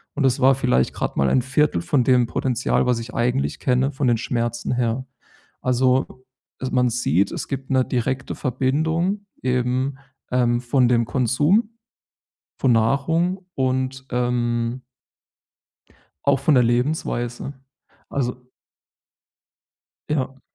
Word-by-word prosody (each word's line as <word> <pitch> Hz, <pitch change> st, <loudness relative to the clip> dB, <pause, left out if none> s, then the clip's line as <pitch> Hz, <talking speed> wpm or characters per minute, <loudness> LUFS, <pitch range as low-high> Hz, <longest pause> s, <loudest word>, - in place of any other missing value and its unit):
und 140 Hz, -, 0 dB
das 130 Hz, -1 st, +2 dB
war 135 Hz, +1 st, +6 dB
vielleicht 125 Hz, -, +1 dB
gerade -, -, -3 dB
mal 70 Hz, -1 st, +3 dB
ein 130 Hz, -, +3 dB
1/4 130 Hz, -, +1 dB
von 125 Hz, +9 st, +1 dB
dem 125 Hz, -1 st, +3 dB
Potenzial, 125 Hz, +1 st, 0 dB
was 125 Hz, -2 st, +1 dB
ich 115 Hz, +2 st, -8 dB
eigentlich 125 Hz, +3 st, 0 dB
kenne, 130 Hz, +2 st, +1 dB
von 135 Hz, -1 st, -1 dB
den 120 Hz, -2 st, +3 dB
Schmerzen 120 Hz, -1 st, -2 dB
her. 125 Hz, +1 st, -1 dB, 0.6 s
Also, 130 Hz, +1 st, +1 dB, 0.4 s
e 130 Hz, -, -2 dB
man 125 Hz, -1 st, +3 dB
sieht, 100 Hz, -, +1 dB
es -, -, -5 dB
gibt 135 Hz, -1 st, -5 dB
'ne 130 Hz, -1 st, +3 dB
direkte 130 Hz, +2 st, -2 dB
Verbindung 160 Hz, -, 0 dB, 0.2 s
eben, 130 Hz, +2 st, 0 dB, 0.3 s
ähm, 120 Hz, -1 st, +2 dB
von 125 Hz, 0 st, +2 dB
dem 120 Hz, -1 st, +2 dB
Konsum 145 Hz, -, +2 dB, 0.9 s
von 130 Hz, -, +2 dB
Nahrung 165 Hz, -, +1 dB
und, 130 Hz, 0 st, -1 dB
ähm 120 Hz, 0 st, -1 dB, 1.4 s
auch 140 Hz, -1 st, +3 dB
von 145 Hz, +3 st, +3 dB
der 125 Hz, -, +5 dB
Lebensweise. 120 Hz, 0 st, -1 dB, 0.6 s
Also 125 Hz, -1 st, -3 dB, 1.6 s
Ja. 135 Hz, -3 st, -2 dB
130 Hz, 125 wpm, -22 LUFS, 120-135 Hz, 1.6 s, war